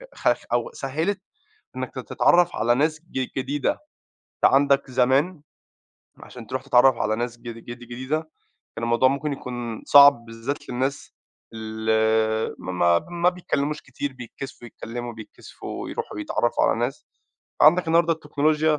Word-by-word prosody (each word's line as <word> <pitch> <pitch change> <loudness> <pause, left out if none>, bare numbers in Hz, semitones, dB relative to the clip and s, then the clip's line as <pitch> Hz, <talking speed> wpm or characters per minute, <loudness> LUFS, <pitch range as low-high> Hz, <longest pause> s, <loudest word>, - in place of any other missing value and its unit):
خف - - 0
أو - - 0
سهّلِت 170 - -2 0.6
إنّك - - -5
ت - - -6
تتعرف 175 0 +2
على 120 +2 +2
ناس 155 +3 +1
ج 130 -1 -2
جديدة. 135 +2 0 0.5
أنت - - +1
عندَك 140 -1 +3
زمان 140 +7 +2 0.8
عشان 120 -3 -11
تروح 130 +4 -3
تتعرف 130 -1 +5
على 110 - 0
ناس 120 +1 -3
جـد 115 -1 -8
جديدة، 120 +5 -4 0.6
كان 115 - -6
الموضوع 120 +2 +3
مُمكن 140 +2 -2
يكون 120 -4 -6
صعب 140 -4 +7
بالذات 115 +5 -6
للناس 130 +3 -3 0.4
اللي 110 0 0
ما 85 -2 +2
ب 85 - -7
ما 175 0 +2
بيتكلّموش 150 -4 -2
كتير، 135 +1 -5
بيتكسفوا 125 0 -9
يتكلموا، 120 +1 -7
بيتكسفوا 110 -1 -9
يروحوا - - -5
يتعرفوا 120 +2 0
على 115 - +1
ناس. 120 +3 -3 0.6
عندَك 170 +4 +6
النهارده 165 0 +4
التكنولوجيا، 155 0 +1
130 Hz, 135 wpm, -24 LUFS, 115-150 Hz, 0.8 s, صعب